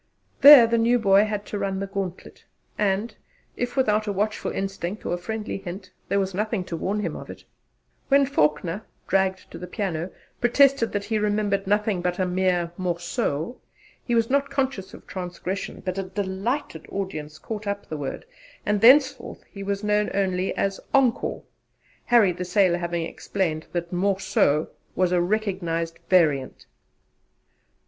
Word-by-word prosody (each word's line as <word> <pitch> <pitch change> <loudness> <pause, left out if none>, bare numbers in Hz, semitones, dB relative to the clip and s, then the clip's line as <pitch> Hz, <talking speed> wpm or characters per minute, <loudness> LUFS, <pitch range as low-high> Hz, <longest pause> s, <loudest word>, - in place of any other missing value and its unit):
There 280 -3 +11
the 230 0 +1
new 235 +2 +4
boy 200 -2 +4
had 210 -1 -3
to 205 - -4
run 195 -1 -2
the 195 - -2
gauntlet, 195 -2 -6 0.3
and, 210 +2 0 0.4
if 245 +2 -3
without 215 -4 +2
a - - 0
watchful 210 +2 -1
instinct 195 0 -4
or - - -1
a - - 0
friendly 215 +2 -4
hint, 185 0 -8 0.2
there 200 - +2
was 195 -1 -1
nothing 210 0 -1
to 180 - -5
warn 200 +5 -2
him - - -3
of - - -9
it. - - -10 0.6
When 275 0 +5
Faulkner 165 - 0 0.3
dragged 190 0 0
to - - -8
the 180 - -7
piano 180 -3 -3 0.3
protested 260 0 +4
that 205 -1 -1
he 215 +1 -1
remembered 205 -2 0
nothing 205 -2 +1
but 180 0 -1
a 185 - +1
mere 180 -2 0
'morceau,' 175 - -2 0.5
he 240 - -1
was 230 -1 +3
not 280 +2 +1
conscious 265 -9 -2
of - - -15
transgression, 185 +1 -5
but 185 +1 -2
a - - +1
delighted 195 - -3
audience 155 -6 -5
caught 210 +5 -6
up 200 0 -3
the 155 - -5
word, 145 - -5 0.4
and 210 -1 +1
thenceforth 265 +3 +4
he 200 - -9
was 200 +1 -3
known 210 0 +1
only 190 -1 0
as 195 0 -1 0.2
'Ankore' 260 -4 +1 0.6
Harry 230 -6 +5
the 180 +1 -5
Sailor 180 -1 +2
having 170 -1 -2
explained 165 -2 -3
that 175 0 -4
'more 190 +2 +1
so' 150 -5 +2 0.3
was 180 0 +2
a 180 -1 +3
recognized 175 -4 -1
variant. 150 -8 +2
195 Hz, 165 wpm, -24 LUFS, 180-215 Hz, 0.6 s, There